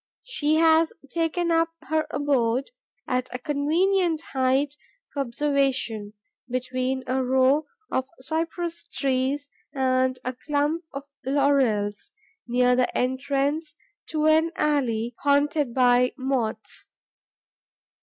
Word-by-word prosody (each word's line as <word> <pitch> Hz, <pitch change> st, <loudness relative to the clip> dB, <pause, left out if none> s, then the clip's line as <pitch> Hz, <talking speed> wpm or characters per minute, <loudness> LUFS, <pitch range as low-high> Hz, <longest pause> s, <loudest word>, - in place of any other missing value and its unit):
She 310 Hz, -11 st, 0 dB
has 320 Hz, 0 st, +4 dB, 0.2 s
taken 340 Hz, +1 st, 0 dB
up 330 Hz, 0 st, +3 dB
her 315 Hz, 0 st, 0 dB
abode, 265 Hz, -3 st, 0 dB, 0.4 s
at 255 Hz, 0 st, -1 dB
a 250 Hz, -, -3 dB
convenient 320 Hz, +6 st, +1 dB
height 265 Hz, +2 st, +2 dB, 0.4 s
for 285 Hz, -, -4 dB
observation, 260 Hz, -5 st, 0 dB, 0.4 s
between 255 Hz, +1 st, -2 dB
a 260 Hz, +1 st, 0 dB
row 265 Hz, +4 st, +3 dB, 0.2 s
of 260 Hz, 0 st, 0 dB
cypress 330 Hz, +4 st, -3 dB
trees 270 Hz, +1 st, -1 dB, 0.3 s
and 255 Hz, -1 st, +2 dB
a 255 Hz, -, -2 dB
clump 295 Hz, +5 st, -1 dB
of 275 Hz, 0 st, -6 dB, 0.2 s
laurels, 260 Hz, -7 st, +1 dB, 0.4 s
near 250 Hz, +1 st, +3 dB
the 250 Hz, 0 st, +1 dB
entrance 275 Hz, +4 st, -1 dB, 0.3 s
to 310 Hz, -1 st, -1 dB
an 315 Hz, +1 st, +4 dB
alley 245 Hz, -7 st, 0 dB
haunted 285 Hz, -1 st, +2 dB
by 250 Hz, 0 st, +4 dB
Moths. 255 Hz, -5 st, -3 dB
275 Hz, 105 wpm, -25 LUFS, 255-305 Hz, 0.4 s, has